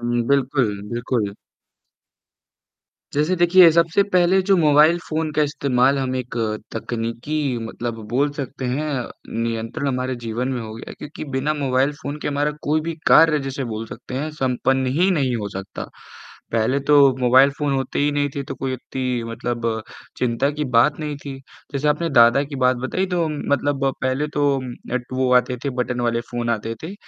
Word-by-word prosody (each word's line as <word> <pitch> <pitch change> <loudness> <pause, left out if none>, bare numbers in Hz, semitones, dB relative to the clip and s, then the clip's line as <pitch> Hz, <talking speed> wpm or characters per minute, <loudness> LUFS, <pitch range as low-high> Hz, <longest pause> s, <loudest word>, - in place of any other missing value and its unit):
हुँ, 120 0 0
बिल्कुल। 130 -6 +1
बिल्कुल। 120 -4 -1 1.8
जैसे 150 +5 +2
देखिए 175 0 +7
सबसे 170 +3 +3
पहले 180 +1 +4
जो 195 - +5
मोबाइल 155 +1 +5
फोन 160 0 -1
का 150 0 +2
इस्तेमाल 140 -2 +2
हम 130 -1 -1
एक 125 -1 -5 0.4
तकनीकी 115 +4 -4 0.3
मतलब 115 0 -5
बोल 135 +6 +1
सकते 135 -1 -5
हैं, 135 +5 -1 0.5
नियंत्रण 115 +4 -3
हमारे 130 -1 -2
जीवन 115 +3 -2
में 125 - -2
हो 110 -1 -7
गया 115 - -9
क्योंकि 150 - -8
बिना 145 +3 0
मोबाइल 135 -1 +1
फोन 145 +1 -4
के - - -1
हमारा 145 +1 0
कोई 155 +2 +1
भी 165 +1 -4
कार्य 160 -2 +6
जैसे 135 0 -3
बोल 110 -1 -5
सकते 125 +3 -9
हैं, 150 +4 -2
संपन्न 130 -2 0
ही 185 +2 +4
नहीं 135 -8 +1
हो 105 -2 -4
सकता। 95 -1 -7 0.7
पहले 115 +5 +1
तो 145 +2 +3 0.2
मोबाइल 130 +3 +6
फोन 145 -2 0
होते 135 -1 -2
ही 145 +1 +2
नहीं 145 0 +1
थे 140 - -1
तो 135 - -6
कोई 130 0 -3
इतनी 130 -1 -3
मतलब 115 -1 -2 0.4
चिंता 125 +3 +1
की 150 0 -3
बात 145 +6 +4
नहीं 150 -1 -3
थी, 140 -1 -8 0.3
जैसे 145 +1 0
आपने 155 +3 +1
दादा 120 +1 +6
की 140 -1 -7
बात 130 0 +2
बताई 130 +10 -2
तो 180 -2 0
उम, 150 -2 -4
मतलब 140 -1 0 0.2
पहले 130 +3 0
तो 145 -2 +2 0.3
ऐट 125 -1 -1
वो 130 0 +1
आते 125 0 +3
थे 140 - 0
बटन 125 0 -2
वाले 115 -1 0
फोन 120 -1 -2
आते 115 0 -2
थे, 170 +5 -6
135 Hz, 175 wpm, -21 LUFS, 120-150 Hz, 1.8 s, देखिए